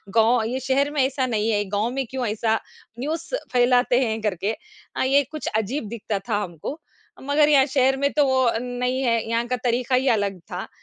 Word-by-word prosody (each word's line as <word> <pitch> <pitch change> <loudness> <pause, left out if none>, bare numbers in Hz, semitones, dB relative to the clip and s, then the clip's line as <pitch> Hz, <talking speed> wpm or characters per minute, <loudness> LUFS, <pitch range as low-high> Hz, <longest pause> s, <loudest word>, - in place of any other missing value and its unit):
गाँव 230 +1 +4
ये 255 +3 -2
शहर 270 +2 +1
में 295 -2 +1
ऐसा 265 0 -1
नहीं 220 -2 0
है, 205 -1 +1
गाँव 205 +3 0
में 270 +1 -2
क्यों 260 -1 -3
ऐसा 220 +1 0 0.4
न्यूज़ 315 +5 -3 0.3
फैलाते 245 0 +4
हैं 220 -2 -2
करके। 210 +1 -1 0.4
हाँ, - - +1
ये 275 +2 +4
कुछ 310 -1 -5
अजीब 220 +4 -2
दिखता 210 -2 -3
था 210 - +2
हमको, 175 - -7 0.4
मगर 290 +2 +3
यहाँ 275 -3 +6
शहर 265 -1 +2
में 280 +1 +1
तो 295 -1 +3
वो 260 0 +2
अ, 230 -2 +2
नहीं 250 +1 -2
है, 230 -2 +2
यहाँ 230 +1 0
का 250 - 0
तरीका 250 +1 +1
ही 260 +2 +1
अलग 200 -4 0
था 180 +1 -4
245 Hz, 205 wpm, -23 LUFS, 220-270 Hz, 0.4 s, यहाँ